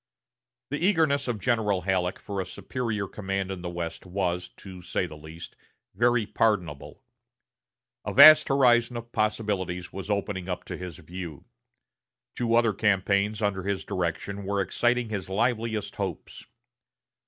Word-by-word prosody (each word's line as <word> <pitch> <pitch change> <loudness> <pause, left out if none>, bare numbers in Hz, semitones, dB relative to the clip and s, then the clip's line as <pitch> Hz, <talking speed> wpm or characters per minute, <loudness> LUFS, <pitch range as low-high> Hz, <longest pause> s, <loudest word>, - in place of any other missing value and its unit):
The 145 +3 -2
eagerness 160 -8 +2
of 120 -4 -2
General 105 -4 +1
Halleck 90 0 0
for 100 -2 -4
superior 105 +3 -4
command 95 -1 -3
in 95 -2 -5
the 90 - -4
West 85 -1 -5
was, 90 -1 -2
to 95 -2 -10
say 90 - -2
the 80 -3 -9
least, 80 +2 -10 0.4
very 120 +2 +2
pardonable. 95 -9 -1 1.0
A - - -3
vast 155 0 +9
horizon 125 -3 +3
of 120 0 -8
possibilities 100 -5 -1
was 95 +1 -7
opening 100 -2 -2
up 90 - -3
to - - -6
his 90 -4 -7
view. 85 -2 -8 0.9
Two 115 -1 +1
other 115 -2 +4
campaigns 100 +1 +1
under 100 -2 0
his 100 +1 -3
direction 95 +3 -3
were 100 +1 -1
exciting 120 +4 +1
his 100 -4 -4
liveliest 110 +1 -1
hopes. - - -5
100 Hz, 140 wpm, -27 LUFS, 90-115 Hz, 1.0 s, vast